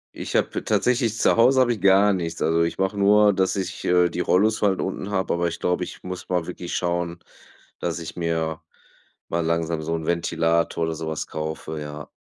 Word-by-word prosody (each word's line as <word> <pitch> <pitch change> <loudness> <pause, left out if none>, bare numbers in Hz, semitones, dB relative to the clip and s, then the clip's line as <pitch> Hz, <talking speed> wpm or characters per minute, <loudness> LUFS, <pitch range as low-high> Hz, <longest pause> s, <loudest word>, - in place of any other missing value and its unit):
Ich - - -5
habe - - 0
tatsächlich 120 -3 +1
zu - - +3
Hause 130 +3 +5
habe 120 -1 +3
ich 105 - -7
gar 100 +2 +5
nichts. 85 -3 -3
Also, 85 +1 +2
ich 85 - -2
mache 95 +1 -1
nur, 105 +1 +5
dass 95 0 0
ich, 95 -1 -4
äh, 90 -1 +4
die 85 - -5
Rollos 110 +5 +2
halt 100 -3 +2
unten 95 +1 -4
habe, 95 -2 0
aber 85 0 0
ich 85 - -4
glaube, 90 0 0
ich - - -11
muss 90 0 -7
mal 90 -2 -1
wirklich 90 -1 -5
schauen, 85 -1 -2 0.6
dass 85 -1 -2
ich 85 +1 -8
mir 80 -1 -2 0.7
mal 85 0 -1
langsam 85 -1 -1
so 80 +1 -2
'n 80 -1 -4
Ventilator 85 0 0
oder 80 0 -2
so 80 0 -6
was 80 -1 -3
kaufe, 80 0 -5
ja. 75 0 -8
85 Hz, 205 wpm, -23 LUFS, 80-95 Hz, 0.7 s, Hause